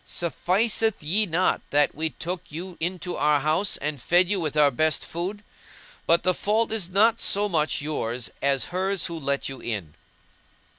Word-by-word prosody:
Sufficeth 200 +5 0
ye 200 +8 +2
not 175 +2 +1
that 145 0 +3
we 160 +2 -1
took 175 +3 -6
you 175 +4 -7
into 175 +1 -3
our 150 0 +3
house 155 +8 0
and 145 -3 -4
fed 175 +5 +3
you 200 - +1
with 155 -3 -3
our 145 -2 +5
best 155 +4 +1
food? 190 +5 -4 0.6
But 170 +1 +4
the 185 - +3
fault 215 +5 0
is 210 -6 -1
not 220 +5 +3
so 205 +1 +1
much 155 -6 0
yours 125 -5 -3
as 135 -1 +2
hers 190 0 -1
who 170 -1 -4
let 140 -1 -1
you 135 -1 -7
in." 100 -10 -5
170 Hz, 170 wpm, -25 LUFS, 150-190 Hz, 0.6 s, our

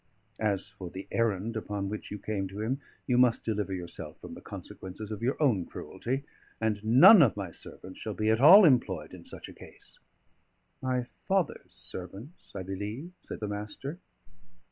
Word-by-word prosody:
As 105 -2 0
for 100 -3 -9
the 95 +2 -8
errand 115 -1 0
upon 105 -2 -3
which 105 +2 -5
you 105 - -5
came 100 -1 -3
to 95 +2 -8
him, 130 +6 -1 0.2
you 125 -1 +2
must 125 -2 +4
deliver 105 -3 -1
yourself 90 -2 -6
from - - -9
the - - -10
consequences 100 +3 -8
of 105 0 -5
your 125 +4 0
own 120 - +3
cruelty, 135 +3 -4 0.4
and 110 -2 -1
none 130 - +9
of 120 -8 +4
my 95 -4 -4
servants 95 +3 -10
shall 110 -2 -4
be 110 0 +2
at 110 +2 +2
all 190 +8 +10
employed 95 - +2
in 90 -2 -11
such - - -8
a - - -11
case." - - -15 0.8
"My 125 -1 0 0.2
father's 190 -4 0
servants, 100 - -9
I 95 - -4
believe," 105 - -5
said - - -8
the 105 - -2
Master. 105 - -5
110 Hz, 175 wpm, -29 LUFS, 95-125 Hz, 0.8 s, all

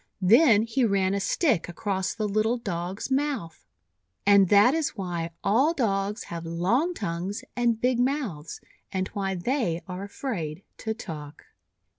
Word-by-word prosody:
Then 220 - +6
he 235 +3 0
ran 195 -3 +2
a 200 - 0
stick 220 - +1
across 190 +1 -2
the 215 -2 -1
little 215 +4 +1
Dog's 190 +1 -4
mouth. 265 - -2 0.6
And 200 -2 +6
that 205 +5 +6
is 320 -5 -1
why 175 -4 -3
all 270 +11 +3
Dogs 205 -4 -1
have 170 -1 -6
long 195 - 0
tongues 190 - -4
and 235 -2 +1
big 250 0 +1
mouths, 245 - -2 0.3
and 185 -1 -2
why 195 -1 -2
they 180 - -1
are 180 0 -5
afraid 195 - -5
to 220 0 -3
talk. 150 -8 -8
200 Hz, 145 wpm, -26 LUFS, 180-240 Hz, 0.6 s, Then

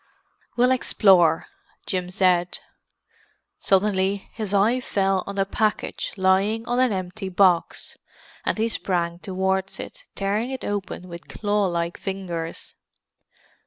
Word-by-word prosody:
"We'll 250 +1 +4
explore," 185 -9 +4 0.4
Jim 180 -1 -2
said. 180 -1 +2 1.0
Suddenly 195 0 +1
his 215 -4 -3
eye 210 +5 +3
fell 195 -5 0
on 200 0 -6
a 195 - +2
package 215 +2 -1
lying 195 +4 +2
on 245 +1 0
an 255 -2 +3
empty 190 +1 -4
box, 180 -2 +1 0.4
and - - 0
he 220 +1 +1
sprang 175 -5 -1
towards 190 0 -1
it, - - -9
tearing 205 +5 -1
it 265 -1 -5
open 195 -3 -4
with 170 -1 -10
claw 205 -1 0
like 170 -1 -2
fingers. 175 -4 -5
195 Hz, 125 wpm, -24 LUFS, 180-210 Hz, 1.0 s, We'll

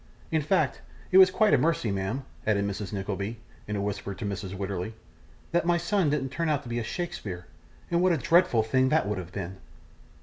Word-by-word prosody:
In 160 -1 +2
fact, 180 +6 +1 0.3
it 190 - +8
was 190 -1 +9
quite 215 +3 +3
a - - +6
mercy, 150 -9 +1
ma'am,' 100 +7 -2 0.2
added 100 -2 +2
Mrs. 100 -1 -4
Nickleby, 100 +2 -3 0.3
in 105 - -2
a 100 - -1
whisper 100 -1 -3
to 100 - -5
Mrs. 100 -1 -4
Wititterly, 100 +2 -3 0.6
'that 175 - +2
my 175 0 +4
son 170 -1 +1
didn't 140 -2 0
turn 165 +4 -1
out 145 -2 +1
to 120 - -9
be 120 0 -1
a - - -2
Shakespeare, 105 - -5 0.5
and 170 0 +3
what 185 0 +4
a 170 - +3
dreadful 165 -4 +4
thing 130 +4 +2
that 155 -8 +2
would 105 -2 -1
have 90 -1 -8
been! 95 -1 -5
115 Hz, 210 wpm, -28 LUFS, 100-165 Hz, 0.6 s, was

